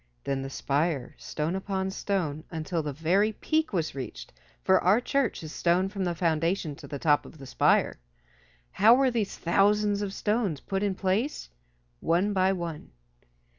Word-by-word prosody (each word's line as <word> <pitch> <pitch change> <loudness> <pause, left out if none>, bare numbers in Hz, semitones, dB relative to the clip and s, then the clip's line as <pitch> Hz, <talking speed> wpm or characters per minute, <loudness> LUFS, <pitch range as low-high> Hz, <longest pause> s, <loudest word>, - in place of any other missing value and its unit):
Then 135 -1 -2
the 135 - -5
spire, 140 0 -1
stone 155 +4 -3
upon 190 0 -2
stone, 170 -7 -2
until 165 +1 -2
the 150 -1 -3
very 180 +9 +1
peak 315 +6 0
was 170 -6 -1
reached, 135 -3 -7 0.3
for 190 -1 +4
our 195 +6 +5
church 255 -6 -1
is 155 - -7
stone 180 +2 +2
from 195 -2 -3
the 175 -1 -1
foundation 165 -1 0
to - - -11
the 140 - -5
top 145 0 +3
of - - -13
the 140 - -10
spire. 130 - +2 0.7
How 225 +4 +6
were 265 0 +3
these 225 -4 -2
thousands 205 +3 +2
of 200 -2 -2
stones 210 - -1
put 195 +5 -3
in 200 -2 0
place? 195 - -1 0.5
One 185 +5 +1
by 190 0 +3
one. 170 -5 -5
185 Hz, 170 wpm, -27 LUFS, 155-205 Hz, 0.7 s, How